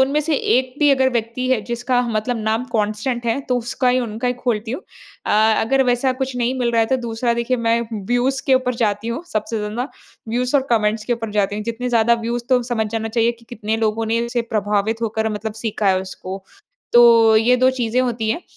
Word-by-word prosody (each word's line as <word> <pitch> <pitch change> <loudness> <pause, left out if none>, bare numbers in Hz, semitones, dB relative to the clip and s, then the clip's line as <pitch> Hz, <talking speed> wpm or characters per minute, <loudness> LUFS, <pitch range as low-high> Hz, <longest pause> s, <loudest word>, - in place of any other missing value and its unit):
उनमें 275 +3 +3
से 305 +1 0
1 255 0 +1
भी 295 -1 +4
अगर 265 -1 +3
व्यक्ति 235 +2 -2
है, 255 -4 +2
जिसका 245 +1 0
मतलब 230 +2 -1
नाम 220 +3 0
कांस्टेंट 215 +3 -1
है, 230 +4 0
तो 255 -2 -1
उसका 245 +2 -1
ही 250 +1 +3
उनका 235 +1 -3
ही 245 - 0
खोलती 235 -3 -2
हूँ। 265 +10 -4 0.4
अ, - - 0 0.3
अगर 270 +4 +2
वैसा 250 +1 +2
कुछ 265 -1 -2
नहीं 245 +1 0
मिल 240 -2 +1
रहा 230 - +3
है, 225 - +2
तो 260 - +1
दूसरा 230 +1 0
देखिए 235 +2 0
मैं 230 0 +1 0.3
व्यूज 250 +3 +1
के 265 - +5
ऊपर 255 -1 +1
जाती 215 -1 -1
हूँ। 235 +7 -3
सबसे 215 +1 -2
ज़्यादा 215 +5 -3 0.4
व्यूज 250 +4 -1
और 270 -2 +3
कमेंट्स 215 -1 +1
के 240 - 0
ऊपर 230 -2 -4
जाती 205 -1 0
हूँ, 210 - -3
जितने 230 +2 -3
ज़्यादा 235 -1 +3
व्यूज 240 0 -2
तो 255 -2 +3
समझ 235 -2 -1
जाना 225 0 -2
चाहिए 230 +1 +1
कि 235 0 -20
कितने 220 -2 -3
लोगों 225 0 0
ने 225 +1 0
इससे 240 0 -1
प्रभावित 210 +2 0
होकर 220 0 -1
मतलब 215 +1 -4
सीखा 215 -1 -1
है 185 -1 +3
उसको। 190 0 -7 0.5
तो 230 -2 +7
ये 235 +3 +4
2 255 +1 +4
चीज़ें 250 -1 0
होती 235 -3 -1
हैं 335 - -2
235 Hz, 225 wpm, -20 LUFS, 220-250 Hz, 0.5 s, तो